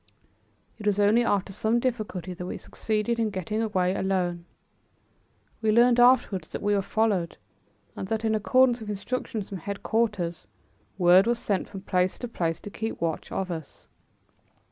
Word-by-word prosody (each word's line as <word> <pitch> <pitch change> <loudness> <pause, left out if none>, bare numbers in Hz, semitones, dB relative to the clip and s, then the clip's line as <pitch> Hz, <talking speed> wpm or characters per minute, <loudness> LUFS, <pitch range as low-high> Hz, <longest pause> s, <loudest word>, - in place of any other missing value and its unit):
It 210 - -4
was 205 -1 +2
only 210 +4 +4
after 200 -3 0
some 220 +4 +1
difficulty 215 -7 -3
that 180 0 -7
we - - -4
succeeded 220 +2 -2
in 225 -1 +1
getting 205 +3 -3
away 185 -5 +1
alone. 180 -3 -1 1.2
We 220 -1 +2
learned 240 +2 +5
afterwards 240 -6 +4
that - - -6
we 205 0 +2
were 200 - +2
followed, 195 -4 0 0.6
and 190 - -5
that, 225 +2 -2
in 220 - +2
accordance 245 +3 +3
with 220 -2 -8
instructions 210 0 -4
from 195 - -5
headquarters, 200 - -2 0.5
word 185 +2 +6
was 235 0 +2
sent 200 -4 -2
from 195 - -8
place 185 -1 0
to 245 - -5
place 165 -7 -2
to 205 - -8
keep 225 +2 -4
watch 165 -2 -3
of 190 -1 -2
us. 160 -4 -8
205 Hz, 165 wpm, -26 LUFS, 185-225 Hz, 1.2 s, word